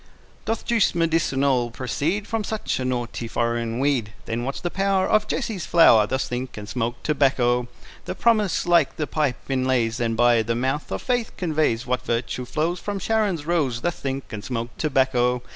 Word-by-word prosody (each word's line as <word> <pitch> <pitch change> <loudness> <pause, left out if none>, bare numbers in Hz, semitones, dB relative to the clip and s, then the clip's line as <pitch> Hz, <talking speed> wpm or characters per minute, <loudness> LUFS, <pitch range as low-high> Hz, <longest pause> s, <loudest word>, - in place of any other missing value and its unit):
Doth 225 - -2
juice 230 -6 +2
medicinal 140 -7 +1
proceed 145 - -2
From 225 -1 -2
such 215 -6 -2
a 130 - -2
naughty 120 -2 -3
foreign 115 0 -1
weed? 130 -6 0
Then 115 +1 -3
what's 135 +2 -3
the 175 - -3
power 195 -1 +1
Of 215 0 +2
Jesse's 220 -8 -3
flower? 115 -11 +6
Thus 130 +3 -1
think, 125 0 -5
and 105 -1 -7
smoke 120 +1 -3
tobacco. 125 -4 +2 0.4
The - - -4
promise, 215 -6 +2
like 170 -4 +3
the 155 - -2
pipe, 145 -6 0
inlays, 130 -3 0
And 115 -1 -1
by 120 -1 +5
the 115 +1 -1
mouth 130 +5 -2
of - - -3
faith 245 -3 -1
conveys, 155 -9 0
What 125 0 -1
virtue 125 0 -2
flows 165 +7 -1
From 205 -1 -4
Sharon's 195 -6 0
rose. 145 -8 0
Thus 175 - -2
think, 135 -2 -4
and 105 -1 -5
smoke 120 -2 -4
tobacco. 130 -4 +1
130 Hz, 175 wpm, -23 LUFS, 120-170 Hz, 0.4 s, flower